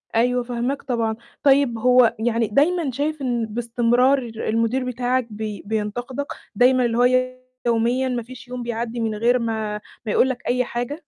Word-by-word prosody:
أيوه 245 +2 +2
فاهماك 245 +3 -2
طبعًا، 230 -3 -1 0.3
طيب 275 -4 +4
هو 250 0 +4
يعني 230 0 +1
دايمًا 295 - +2
شايف 290 +3 -2
إن 240 -3 0
باستمرار 240 +4 +2
المدير 230 +1 -1
بتاعك 250 0 -1
بي 215 -1 -6
بينتقدك، 235 +6 -3 0.3
دايمًا 250 +2 +4
اللي 230 -1 0
هو 255 +1 +3 0.3
يوميًا 235 +3 +2
ما 245 -2 -2
فيش 255 +1 -12
يوم 245 -1 -5
بيعدّي 235 0 -3
من 225 -1 -1
غير 240 +4 +2
ما 220 -2 -2 0.2
ما 215 - -1
يقُول 260 - +3
لك 260 -1 -5
أي 250 +1 +2
حاجة؟ 245 +7 -4
240 Hz, 165 wpm, -22 LUFS, 230-255 Hz, 0.3 s, طيب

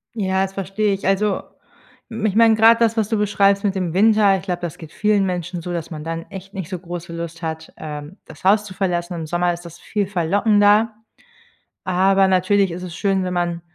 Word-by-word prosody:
Ja, 190 -2 0
das 195 0 -4
verstehe 195 +2 -1
ich. 195 - -5
Also, 195 +1 +1 0.7
m 225 -2 -4
ich 205 -1 0
meine, 225 -1 +6
gerade 225 +1 +6
das, 230 -1 +2
was 215 -1 +1
du 220 - +1
beschreibst 200 -1 +2
mit 195 -1 0
dem 180 -3 -2
Winter, 210 0 +4
ich - - -9
glaube, 180 -2 -3
das 170 -3 -5
geht 160 -2 -11
vielen 210 -2 +1
Menschen 180 -1 -3
so, 175 +1 -5
dass 170 0 -5
man 155 -1 -6
dann 165 0 -4
echt 195 0 -9
nicht 190 -3 -6
so 185 -3 -4
große 175 -1 -7
Lust 170 0 -6
hat, 160 0 -5
ähm, 150 +2 -8
das - - -14
Haus 205 +2 +4
zu 190 - -9
verlassen. 175 -2 -2
Im 160 -2 -5
Sommer 175 +1 0
ist 170 0 -9
das 170 0 -11
viel 205 -3 -2
verlockender. 205 +4 +3 0.9
Aber 190 +1 +3
natürlich 190 0 +2
ist 180 +2 -6
es 175 -2 -7
schön, 195 -1 0
wenn 180 0 -3
man 175 -1 -1
190 Hz, 220 wpm, -20 LUFS, 175-205 Hz, 0.9 s, meine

